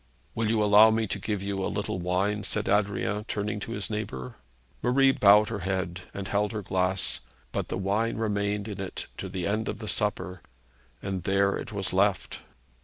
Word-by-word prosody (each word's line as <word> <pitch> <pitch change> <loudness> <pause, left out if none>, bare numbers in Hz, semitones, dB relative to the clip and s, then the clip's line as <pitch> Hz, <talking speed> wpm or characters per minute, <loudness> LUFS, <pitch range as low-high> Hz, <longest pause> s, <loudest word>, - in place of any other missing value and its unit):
'Will 115 -1 0
you 110 -1 +2
allow 105 +2 +8
me 110 0 +1
to 100 - -3
give 100 0 -2
you 100 -1 -2
a - - 0
little - - -2
wine?' 95 +4 0
said - - -1
Adrian, 105 +1 +1
turning 105 -1 -2
to 115 - -5
his 105 -3 -2
neighbour. 65 - -5 0.4
Marie 135 +2 +4
bowed 105 -3 +6
her 110 -3 -3
head, 95 -1 -2
and 100 -1 -5
held 105 +1 0
her 105 -2 -3
glass, 95 0 +1 0.3
but - - -2
the - - -3
wine 105 +5 0
remained 105 -1 -1
in 100 -3 -5
it 95 - -5
to 95 - -4
the 90 -2 -3
end 110 +3 -1
of - - -3
the 110 0 -7
supper, 100 -4 -1 0.6
and 95 -2 -2
there 100 +2 +2
it - - -6
was 100 -3 -2
left. 95 0 +1
100 Hz, 190 wpm, -27 LUFS, 95-105 Hz, 0.6 s, allow